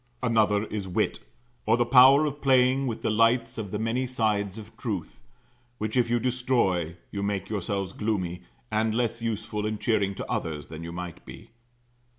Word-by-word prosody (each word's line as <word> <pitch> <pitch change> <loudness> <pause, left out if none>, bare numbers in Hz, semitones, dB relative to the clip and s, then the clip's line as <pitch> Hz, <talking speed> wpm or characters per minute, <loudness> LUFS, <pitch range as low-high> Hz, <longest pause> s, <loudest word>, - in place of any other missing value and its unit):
Another 110 -3 +3
is 105 -3 -4
wit; 90 - 0 0.5
or 115 +2 +4
the 120 - +2
power 135 +4 +7
of 145 0 -4
playing 130 0 +3
with 115 -2 -4
the - - +1
lights 115 +2 +2
on 105 -3 -4
the 105 - -3
many 115 +4 -1
sides 105 -5 0
of 110 +1 -11
truth; 110 -7 -5 0.6
which 110 +1 -3
if 120 -2 +2
you 120 0 +2
destroy, 120 -9 0 0.2
you 100 - -3
make 100 -1 -2
yourselves 100 -2 -2
gloomy, 90 -5 -2 0.3
and 110 0 +1
less 115 -1 -1
useful 110 -2 -3
and 110 -1 -3
cheering 100 -4 +1
to - - -5
others 75 -3 -3
than 80 +1 -8
you 85 - -6
might 90 -1 -7
be. - - -12
110 Hz, 175 wpm, -27 LUFS, 100-120 Hz, 0.6 s, power